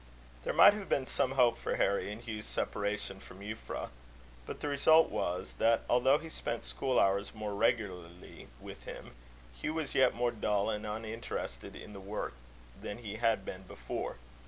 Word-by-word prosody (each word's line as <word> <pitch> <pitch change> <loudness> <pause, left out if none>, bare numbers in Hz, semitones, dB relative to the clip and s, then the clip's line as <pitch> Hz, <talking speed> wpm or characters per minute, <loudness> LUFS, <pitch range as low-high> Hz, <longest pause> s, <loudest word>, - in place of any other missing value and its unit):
There - - 0
might - - +9
have 205 -2 -6
been 135 - +2
some 130 0 0
hope 125 -3 +4
for - - -1
Harry 100 +1 +1
in 110 +3 -7
Hugh's 110 -2 -5
separation 100 -1 -2
from 95 0 -13
Euphra; 110 +2 -5 0.6
but - - -5
the - - -3
result 160 +3 +5
was, 90 -4 -2
that, 115 0 +4
although 130 +3 +5
he 160 +2 -8
spent 115 -7 -4
school 130 -2 +1
hours 100 +2 +2
more 105 -1 -3
regularly 90 -5 -1
with - - -10
him, - - -8 0.5
Hugh 155 - -1
was 155 -4 -2
yet 130 -2 +4
more 120 0 +1
dull, 105 -1 +1
and 105 0 -3
uninterested 110 +2 -5
in 105 - -9
the 100 - -8
work, 100 -7 -4 0.5
than 105 - -5
he 110 -3 -6
had 115 -4 +2
been 95 - -6
before. - - -5
110 Hz, 175 wpm, -33 LUFS, 100-125 Hz, 0.6 s, might